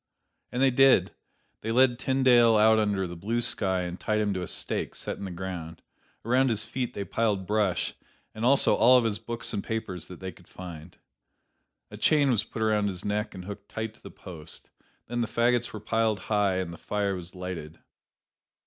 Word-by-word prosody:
And 125 Hz, +2 st, 0 dB
they 135 Hz, -, +5 dB
did. 130 Hz, -8 st, +5 dB, 0.5 s
They 110 Hz, -, -3 dB
led 125 Hz, 0 st, +4 dB
Tyndale 125 Hz, -4 st, +4 dB
out 110 Hz, +1 st, +5 dB
under 100 Hz, -3 st, +1 dB
the 85 Hz, -1 st, -6 dB
blue 110 Hz, +8 st, -2 dB
sky 95 Hz, -6 st, +2 dB
and 90 Hz, 0 st, -5 dB
tied 110 Hz, 0 st, 0 dB
him 105 Hz, -1 st, +1 dB
to 90 Hz, -, -3 dB
a 90 Hz, -, -4 dB
stake -, -, -3 dB
set -, -, -5 dB
in 100 Hz, -, -5 dB
the -, -, -5 dB
ground. 85 Hz, -2 st, -6 dB, 0.4 s
Around 130 Hz, +3 st, +3 dB
his 110 Hz, -2 st, +1 dB
feet 125 Hz, -2 st, -4 dB
they 100 Hz, -, -3 dB
piled 105 Hz, -4 st, 0 dB
brush, 105 Hz, -2 st, 0 dB, 0.4 s
and 110 Hz, -, -6 dB
also 135 Hz, +3 st, +4 dB
all 125 Hz, +2 st, +6 dB
of 125 Hz, -, +3 dB
his 110 Hz, -2 st, -1 dB
books 115 Hz, +1 st, -4 dB
and 100 Hz, -, -2 dB
papers 95 Hz, -7 st, -4 dB
that 90 Hz, -, -10 dB
they 95 Hz, 0 st, -5 dB
could -, -, -20 dB
find. 85 Hz, -2 st, -10 dB, 0.9 s
A -, -, -8 dB
chain 145 Hz, -3 st, +3 dB
was 110 Hz, -3 st, +2 dB
put 110 Hz, 0 st, -5 dB
around 105 Hz, -1 st, +2 dB
his 95 Hz, -3 st, -5 dB
neck 105 Hz, 0 st, -2 dB
and 90 Hz, -1 st, -8 dB
hooked 100 Hz, 0 st, -8 dB
tight 110 Hz, 0 st, -4 dB
to -, -, -25 dB
the -, -, -10 dB
post. 85 Hz, -4 st, -9 dB, 0.3 s
Then 120 Hz, +1 st, -2 dB
the 115 Hz, -, 0 dB
fagots 120 Hz, +1 st, +1 dB
were 110 Hz, -, -6 dB
piled 110 Hz, 0 st, 0 dB
high, 100 Hz, -3 st, +2 dB
and 90 Hz, -2 st, -3 dB
the -, -, -11 dB
fire 100 Hz, -1 st, -1 dB
was 90 Hz, 0 st, -8 dB
lighted. 90 Hz, -4 st, -6 dB
105 Hz, 205 wpm, -27 LUFS, 95-115 Hz, 0.9 s, all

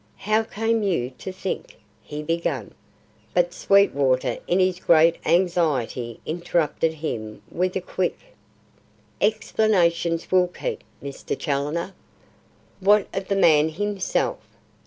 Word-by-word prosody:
"How 215 Hz, +2 st, +1 dB
came 225 Hz, +1 st, -1 dB
you 170 Hz, -11 st, 0 dB
to 190 Hz, -, -5 dB
think 195 Hz, -, -5 dB
" -, -, -36 dB
he 150 Hz, 0 st, -7 dB
began; 165 Hz, +2 st, -2 dB, 0.6 s
but -, -, +2 dB
Sweetwater 140 Hz, -11 st, +2 dB
in 180 Hz, -, +2 dB
his 185 Hz, -1 st, +2 dB
great 165 Hz, -1 st, +5 dB
anxiety 155 Hz, -9 st, +1 dB
interrupted 165 Hz, -1 st, 0 dB
him 110 Hz, -9 st, -5 dB
with 185 Hz, +1 st, -1 dB
a 190 Hz, -, 0 dB
quick: 185 Hz, 0 st, -2 dB, 1.0 s
"Explanations 180 Hz, -6 st, +1 dB
will 185 Hz, -1 st, +4 dB
keep, 450 Hz, -, -5 dB, 0.2 s
Mr. 140 Hz, -1 st, -5 dB
Challoner. 150 Hz, +6 st, -2 dB, 0.9 s
What 205 Hz, +1 st, +4 dB
of 195 Hz, 0 st, -3 dB
the 200 Hz, -, 0 dB
man 160 Hz, -5 st, +5 dB
himself? 205 Hz, -, -1 dB
175 Hz, 115 wpm, -24 LUFS, 155-200 Hz, 1.0 s, great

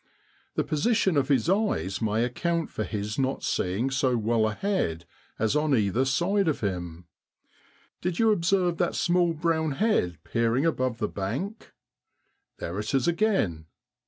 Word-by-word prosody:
The -, -, +1 dB
position 190 Hz, +3 st, +1 dB
of 140 Hz, -2 st, +2 dB
his 135 Hz, -1 st, +2 dB
eyes 190 Hz, -, 0 dB
may 110 Hz, +1 st, +1 dB
account 165 Hz, +7 st, -1 dB
for 110 Hz, -, -3 dB
his 105 Hz, +3 st, -4 dB
not 135 Hz, 0 st, -1 dB
seeing 100 Hz, +9 st, 0 dB
so 130 Hz, -2 st, +1 dB
well 110 Hz, 0 st, +1 dB
ahead 105 Hz, -, -1 dB, 0.3 s
as 110 Hz, +5 st, +1 dB
on 150 Hz, -2 st, +2 dB
either 105 Hz, +5 st, +1 dB
side 180 Hz, +8 st, +1 dB
of 155 Hz, -, 0 dB
him. 90 Hz, -4 st, -4 dB, 1.0 s
Did 180 Hz, -1 st, -2 dB
you 225 Hz, -1 st, +4 dB
observe 180 Hz, -2 st, +1 dB
that 175 Hz, -, 0 dB
small 175 Hz, -1 st, +2 dB
brown 160 Hz, -2 st, 0 dB
head 135 Hz, -, +1 dB
peering 115 Hz, +5 st, +1 dB
above 130 Hz, -7 st, 0 dB
the 110 Hz, -2 st, -1 dB
bank? 135 Hz, -, -4 dB, 0.9 s
There 90 Hz, +4 st, -4 dB
it 105 Hz, +6 st, -2 dB
is 130 Hz, -2 st, +2 dB
again. 170 Hz, -, +1 dB
135 Hz, 150 wpm, -27 LUFS, 105-175 Hz, 1.0 s, you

